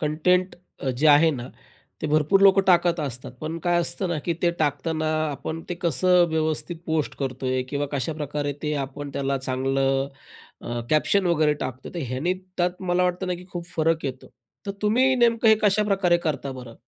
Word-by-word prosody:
Content 180 +5 +1 0.3
अ, 135 - 0
जे 130 +5 0
आहे 160 +3 +6
ना, 125 -3 -5 0.5
ते - - 0
भरपूर 155 +6 +3
लोक 195 0 +7
टाकत 175 -2 +4
असतात. 130 -2 -5
पण 160 +2 -4
काय 175 0 +3
असतं 180 +2 -2
ना 170 -2 -1
की 170 - +1
ते 175 - +4
टाकताना 155 +2 0 0.2
आपण 160 +3 -5
ते 175 - -2
कसं 180 +2 +4
व्यवस्थित 160 +2 -1
पोस्ट 160 -2 -1
करतोय 130 -1 -2
किंवा 145 +1 -2
कशाप्रकारे 145 +1 -2
ते 150 -1 -1
आपण 140 +1 -8
त्याला 140 0 -1
चांगलं 135 +1 0 0.5
अ, 120 0 -4
कॅप्शन 185 +5 +2
वगैरे 155 -3 +3
टाकतो? 130 +1 -5
तर - - -3
ह्याने 135 +9 -1 0.2
त्यात 180 +1 -1
मला 180 +1 +3
वाटतं 180 +1 -1
ना 180 - -1
की 180 +1 -10
खूप 175 -1 -5
फरक 160 0 +1
येतो. 130 -1 -5 0.4
तर - - -1
तुम्ही 250 +5 +3
नेमकं 235 -1 +3
हे 220 - +8
कशाप्रकारे 195 -3 +3
करता 140 -2 -2
बरं? 125 -3 -10
155 Hz, 180 wpm, -24 LUFS, 140-180 Hz, 0.5 s, हे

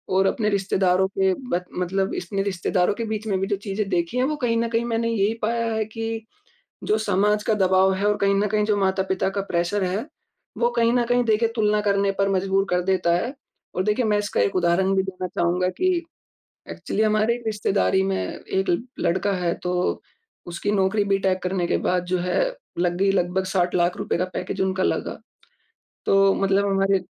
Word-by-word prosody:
और 190 +1 +4
अपने 210 +1 0
रिश्तेदारों 190 -1 +2
के 190 -1 +3 0.2
ब 180 +1 0 0.2
मतलब 190 +2 -1
इसने 195 +3 -3
रिश्तेदारों 185 -1 0
के 230 - -3
बीच 215 0 -4
में 195 -3 0
भी 195 - -1
जो 205 - 0
चीज़ें 200 +1 -2
देखी 175 +5 -1
है 255 - +2
वो 305 - -1
कहीं 230 -1 +2
न 230 0 +1
कहीं 230 +1 0
मैंने 230 0 -1
यही 210 -1 +1
पाया 230 +1 0
है 220 -1 0
कि, 225 0 -5 0.6
जो 215 - +2
समाज 210 0 +1
का 220 - +2
दबाव 190 -1 +3
है 200 +2 -1
और 210 - +2
कहीं 200 0 +2
न 205 +1 +2
कहीं 210 +1 +1
जो 210 -1 +2
माता-पिता 190 0 0
का 200 - -2
प्रेशर 175 +3 0
है, 185 +5 -2 0.5
वो 240 0 +2
कहीं 230 0 +3
न 245 -1 +2
कहीं 245 0 +2
देखे 225 0 +2
तुलना 210 -1 +2
करने 200 -1 +2
पर 195 0 +2
मजबूर 195 +1 +1
कर 180 0 +1
देता 180 -2 +2
है। 245 +10 -3 0.4
और 185 - 0
देखिए 210 +5 +1
मैं 210 -1 +2
इसका 205 0 -1
एक 195 -1 +1
उदाहरण 185 +2 +2
भी 190 - +3
देना 185 -1 -5
चाहूँगा 180 +1 0
कि 370 0 +2 0.8
एक्चुअली 215 - -2
हमारे 215 +2 +2
रिश्तेदारी 200 -2 +1
में 195 0 0
1 190 0 -3 0.3
लड़का 190 +4 +1
है 170 0 +1
तो 180 0 -1 0.4
उसकी 175 +3 -3
नौकरी 200 +1 +2
बीटेक 195 -2 0
करने 180 -1 -1
के - - +2
बाद 180 -1 0
जो 185 0 0
है 180 +1 0 0.4
लग 175 0 +1
गई, 195 +1 +3
लगभग 190 0 0
₹60 185 -2 0
लाख 175 0 +1
रुपए - - -2
का 180 - +1
पैकेज 180 - -4
उनका 190 0 0
लगा, - - -1 0.9
तो 195 0 +4
मतलब 195 +1 +1
हमारे 195 0 +2
195 Hz, 200 wpm, -23 LUFS, 185-210 Hz, 0.9 s, और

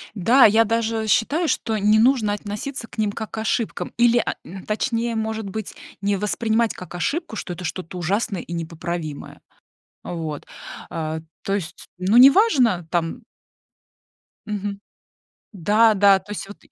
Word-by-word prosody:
Да, 235 +7 +5
я 220 +2 +6
даже, 225 0 0
э, - - -4
считаю, 290 - +2
что 225 -7 -1
не 210 +1 +4
нужно 230 -3 +3
относиться 210 +5 -5
к - - -16
ним 215 -2 +1
как 220 +1 -6
к - - -7
ошибкам 220 +1 -2
или, 240 0 +5
а, 235 - 0
н 190 +2 -10
точнее, 230 +2 -1
может 220 -1 -3
быть, 215 +1 -5 0.3
не 200 0 +1
воспринимать 220 +3 0
как 180 -1 -10
ошибку, 300 - -2
что 180 - -5
это 180 +1 -8
что-то 180 +1 -5
ужасное 195 +2 -1
и 170 - -8
непоправимое. 165 -2 -5 0.6
А - - -6
вот, 160 -3 -5 0.4
а, 160 -1 -3 0.2
то 195 - -2
есть, 185 -4 -6
ну, 190 +5 +2
неважно 255 - +5
там 165 -2 -1 1.2
Мгм. 205 -1 -4 0.7
Да, 210 +4 +4
да, 200 -1 +6
то 190 +2 -10
есть 205 - -5
вот 205 - -11
210 Hz, 160 wpm, -22 LUFS, 185-230 Hz, 1.2 s, я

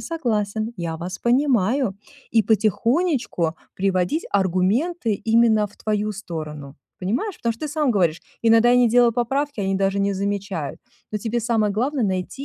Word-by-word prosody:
согласен, 220 -8 -2
я 170 -3 -3
вас 180 +3 -6
понимаю". 245 -4 +1 0.3
И 225 -1 +4
потихонечку 225 - +1 0.2
приводить 185 - 0
аргументы 205 - +1
именно 225 0 +3
в 200 - -19
твою 210 0 -1
сторону, 155 -7 -7 0.2
понимаешь? 245 - -2
Потому 235 -1 -1
что 225 - -17
ты - - -6
сам 295 -3 0
говоришь: 175 -6 +1 0.2
"Иногда 230 +1 +5
я 245 - +5
не 245 -1 +5
делал 240 0 +4
поправки, 270 +2 -1
они 195 0 0
даже 195 +1 +1
не 200 0 +1
замечают". 195 -6 -3 0.3
Но 210 - -1
тебе 230 +3 -2
самое 220 -3 +1
главное 255 +3 0
найти 190 +8 -3
215 Hz, 155 wpm, -22 LUFS, 190-240 Hz, 0.3 s, Иногда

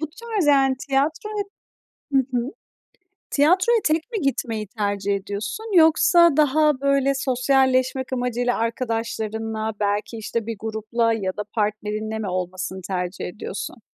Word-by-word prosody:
Bu 310 - -1
tarz, 440 -2 -2
yani, 270 -2 +4
tiyatroya 315 +10 0 0.7
Hı - - +5
hı. 245 +1 -1 0.8
Tiyatroya 370 +11 +4
tek 315 +8 0
mi 435 -5 -2
gitmeyi 230 -6 -1
tercih 200 -1 -1
ediyorsun? 210 - -3
Yoksa 330 0 +6
daha, 300 -1 +3
böyle, 275 0 +2
sosyalleşmek 260 0 +1
amacıyla 245 -1 0
arkadaşlarınla 225 -2 -2
belki, 205 +2 -1
işte, 225 +1 -3
bir 230 - -3
grupla 220 +1 0
ya 195 -4 -1
da 210 - -2
partnerinle 215 0 -2
mi 215 - -3
olmasını 185 +1 -4
tercih 180 -1 -3
ediyorsun? 200 +4 -6
240 Hz, 125 wpm, -23 LUFS, 215-280 Hz, 0.8 s, Yoksa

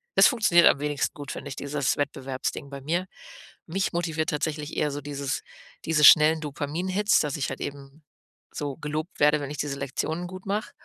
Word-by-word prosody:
Es - - +8
funktioniert 210 -9 +5
am - - +4
wenigsten 145 -1 -1
gut, 145 -1 -7
finde 140 - -7
ich, 135 - -6
dieses 140 -1 -1
Wettbewerbsding 135 -1 -3
bei 140 0 -8
mir. 170 +6 -1 0.6
Mich 190 +4 -1
motiviert 160 -2 -1
tatsächlich 150 0 -3
eher 150 - +1
so 145 +1 -5
dieses 140 -1 -3 0.4
diese 155 -2 +2
schnellen 155 +1 +8
Dopamin-Hits, 175 +8 0
dass 150 0 -2
ich 140 - -2
halt - - -6
eben 140 +2 -8 0.5
so 145 -2 -3
gelobt 155 +2 -5
werde, 150 +1 +4
wenn 140 - -5
ich 150 - -6
diese 140 -1 -3
Lektionen 160 +6 -3
gut 185 +1 -10
mache. 205 +3 -2
150 Hz, 185 wpm, -26 LUFS, 140-165 Hz, 0.6 s, Es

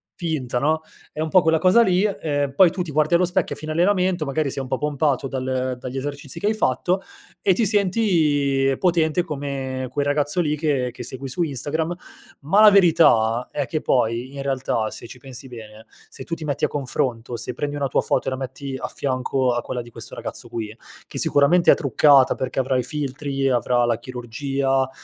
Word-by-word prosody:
finta, 155 -9 -3
no, 155 +4 +1 0.3
è 155 - -5
un 160 - -1
po' 185 +3 +5
quella 160 0 +3
cosa 185 +8 +5
lì 185 -2 +2
ehm, 145 -9 -1
poi 180 0 +6
tu 180 - -4
ti 175 - -4
guardi 155 +3 +1
allo 175 - +3
specchio 180 0 0
a - - -13
fine 155 +1 -5
allenamento, 180 0 +1
magari 145 +1 -1
sei 135 0 -4
un - - -8
po' 130 - -1
pompato 145 -2 0
dal 130 -1 -2
dagli 130 +1 -6
esercizi 145 +3 -5
che 205 - -1
hai 215 - +1
fatto 180 +2 0 0.4
e 195 - +4
ti 225 +5 +1
senti 160 -10 +2
potente 170 -2 +2
come 135 -4 -4
quel 140 +2 -1
ragazzo 145 +4 +1
lì 150 -2 -1
che 140 -5 0
che 125 +1 -9
segui 130 +3 -6
su 170 +7 -1
Instagram. 155 +4 -2 0.5
Ma 165 +9 +3
la 215 -1 +9
verità 125 - +4
è 145 -3 -2
che 155 +5 -2
poi 120 +1 0
in 140 - -5
realtà, 130 -5 -1
se - - -7
ci 125 +2 -12
pensi 130 0 -9
bene, 110 -3 -11 0.2
se - - -9
tu 165 - -7
ti 160 - -8
metti 140 -2 0
a - - +1
confronto, 125 -4 -3
se 125 - -2
prendi 145 +3 -3
una 140 -1 -1
tua - - +1
foto - - -1
e 135 - 0
la 130 - -3
metti 135 +1 -6
a - - -4
fianco 130 -1 -1
a 120 - -1
quella 125 +1 -4
di 120 - -14
questo 110 -2 -8
ragazzo 120 - -7
qui, 110 -2 -5 0.3
che - - -8
sicuramente 150 +5 +4
è - - +6
truccata, 140 -1 +4
perché 130 0 -3
avrà 130 0 0
i 125 - 0
filtri, 135 0 -2
avrà 120 -1 +2
la 120 -1 0
chirurgia, 130 +2 -2
140 Hz, 210 wpm, -22 LUFS, 130-160 Hz, 0.5 s, la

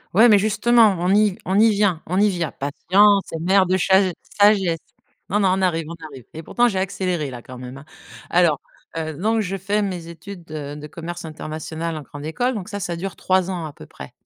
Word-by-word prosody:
Ouais, 225 +4 +7
mais 210 -3 +6
justement, 220 0 +4
on 180 +2 +2
y 205 -2 +3
on 190 +2 +1
y 225 +1 +6
vient 200 -6 +1
on 185 +3 0
y 210 +1 +4
vient! 175 -4 -2
Patience 195 +7 +2
est 165 - -4
mère 190 +2 +3
de 185 +1 +2
chasè 190 0 +3 0.3
sagesse! 195 -5 +4 0.5
Non, 210 - +1
non, 195 - +3
on 190 - -2
arrive, 165 -3 0
on 165 - -7 0.2
arrive 130 -4 -12
et 160 - -7
pourtant, 240 +9 +1
j'ai 195 -5 -1
accéléré 180 -5 -2
là, 120 -2 -9
quand 125 -1 -10
même, 125 +1 -8
hein. 135 - -13 0.5
Alors, 170 -4 +3 0.4
heu, 160 -1 -3
donc 220 +8 0
je 195 -2 -3
fais 200 +2 -1
mes 180 -4 -4
études, 170 +1 -11
heu, 145 -2 -6
de 150 0 -8
commerce 170 +2 -7
international 160 +1 -5
en 155 - -5
grande 145 +1 -10
école. 245 +11 -1
Donc 195 -4 -6
ça, 205 - -5
ça 175 -3 -3
dure 185 +2 -5
3 185 0 +1
ans 170 -3 -4
à 150 - -8
peu - - -13
près. 65 - -11
180 Hz, 225 wpm, -21 LUFS, 160-200 Hz, 0.5 s, Ouais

